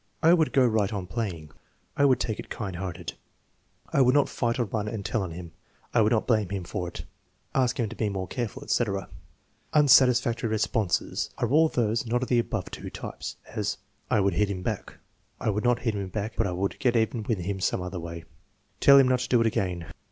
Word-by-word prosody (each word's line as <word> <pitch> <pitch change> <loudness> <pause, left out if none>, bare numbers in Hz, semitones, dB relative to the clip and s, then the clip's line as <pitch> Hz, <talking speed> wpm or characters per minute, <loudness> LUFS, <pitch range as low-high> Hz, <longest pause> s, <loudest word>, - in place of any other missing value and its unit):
"I 165 +2 +7
would 160 -3 +3
go 130 -2 +4
right 110 -4 +1
on 100 -4 -3
playing." 90 -7 -4 0.4
"I 140 - +3
would 130 -3 +4
take 110 - -2
it - - -8
kind 95 -5 -5
hearted." 90 -2 -5 0.8
"I 140 - +4
would 130 +1 +4
not 145 - +4
fight 115 -1 -1
or 120 - +1
run 105 0 -3
and 105 -2 -4
tell 115 - 0
on 95 - -3
him." 85 0 -8 0.4
"I 120 - +4
would 110 +1 +3
not 110 -2 +2
blame 110 -6 +2
him 95 -2 -3
for 90 +1 -4
it." 85 -2 -7 0.5
"Ask 125 -2 +1
him 115 - +1
to - - -8
be 110 - -1
more 95 -2 -3
careful," 125 +2 -4
etc. 100 -8 -1 0.6
Unsatisfactory 125 -5 +5
responses 110 -2 0
are 120 - 0
all 155 +4 +5
those 115 -1 0
not 120 +2 0
of - - -5
the 120 - +4
above 110 -4 -3
two - - -7
types; - - -7
as: - - -2 0.3
"I 105 - +3
would 95 -1 +2
hit 100 +4 +1
them 90 -2 -4
back." - - -4 0.4
"I 110 - 0
would 105 +1 -2
not 125 -1 +3
hit 115 -3 0
them 100 -2 -3
back, 105 +3 -4
but 115 - +1
I - - -2
would 95 +2 -2
get 125 -2 +2
even 105 -4 -1
some 90 - 0
other 90 0 -5
way." 85 0 -7 0.6
"Tell 140 0 +8
them 135 -2 +6
not 130 0 +2
to - - -4
do 120 - +4
it 115 - +3
again." 90 -6 -1
110 Hz, 220 wpm, -27 LUFS, 95-125 Hz, 0.8 s, Tell